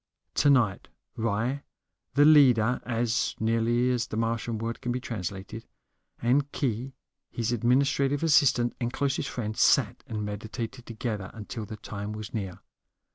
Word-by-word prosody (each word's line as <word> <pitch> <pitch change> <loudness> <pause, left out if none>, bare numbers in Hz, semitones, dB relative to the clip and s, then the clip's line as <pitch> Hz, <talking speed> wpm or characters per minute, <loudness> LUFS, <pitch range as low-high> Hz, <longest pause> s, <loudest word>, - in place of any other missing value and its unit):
Tonight 125 -9 +3 0.3
Ry, 115 +5 -1 0.5
the 145 +1 +6
leader 125 -6 +5
(as 115 -2 0
nearly 115 +2 +2
as 120 -3 0
the 110 - -5
Martian 115 0 -1
word 115 +2 -4
can 120 - -2
be 125 - -1
translated), 105 -1 -6 0.5
and 140 +4 +2
Khee, 130 0 -2 0.3
his 115 0 -2
administrative 135 +4 +2
assistant 135 -6 +4
and 120 0 -1
closest 140 0 -1
friend, 110 -3 -4
sat - - +3
and 105 -1 -3
meditated 115 +4 -6
together 110 -4 -4
until 110 0 -6
the 110 - -7
time 105 0 -6
was 105 -1 -7
near. 95 -5 -4
115 Hz, 135 wpm, -28 LUFS, 110-125 Hz, 0.5 s, the